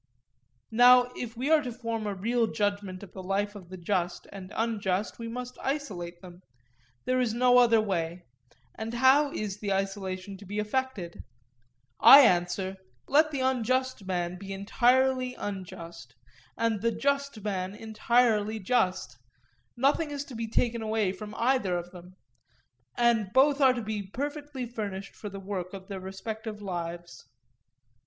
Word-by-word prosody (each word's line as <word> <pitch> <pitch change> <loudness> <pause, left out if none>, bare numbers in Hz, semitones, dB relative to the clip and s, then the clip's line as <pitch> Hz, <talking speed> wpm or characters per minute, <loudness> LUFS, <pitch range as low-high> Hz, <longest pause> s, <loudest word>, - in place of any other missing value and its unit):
Now, 245 +2 +6
if 230 -2 -6
we 270 +6 -1
are 315 -1 +6
to 250 -3 -5
form 230 -2 -4
a 200 - -2
real 230 +4 +1
judgment 205 -3 -2
of 190 - -11
the 190 - -7
life 200 +2 -1
of 190 -4 -12
the 185 - -8
just 175 -1 -2
and 190 -2 -9
unjust, 210 -3 -1
we 230 - -5
must 250 +2 -6
isolate 185 - -4
them; 180 0 -12 0.6
there 255 0 +1
is 230 -3 0
no 250 0 +5
other 230 -2 +5
way; 175 -4 -2 0.5
and 225 +2 -5
how 270 +4 +5
is 210 -5 -4
the 205 -2 -3
isolation 195 0 -3
to 200 - -13
be 205 +2 -5
effected? 210 -5 -3 0.8
I 280 - +11
answer: 185 -3 +2 0.3
Let 305 +3 +4
the 280 -3 -3
unjust 255 -2 0
man 180 -1 -2
be 195 0 -8
entirely 255 +5 +2
unjust, 170 - -7 0.4
and 225 -3 0
the 230 +1 +2
just 280 -5 -1
man 190 -2 -3
entirely 220 0 +1
just; 185 - 0 0.6
nothing 285 +5 +2
is 285 -1 -4
to 260 - -10
be 225 0 -3
taken 235 +1 0
away 215 -3 0
from 210 +3 -8
either 230 -7 +1
of 175 0 -6
them, 180 0 -13 0.8
and 235 -4 +3
both 285 +2 +4
are 260 -2 +6
to 240 -2 -4
be 215 -1 -3
perfectly 285 +5 -5
furnished 205 -5 -6
for 210 - -7
the 195 0 -8
work 190 -1 -5
of 190 +1 -11
their 195 -1 -5
respective 215 +3 -6
lives. 170 -7 -6
215 Hz, 155 wpm, -28 LUFS, 190-250 Hz, 0.8 s, I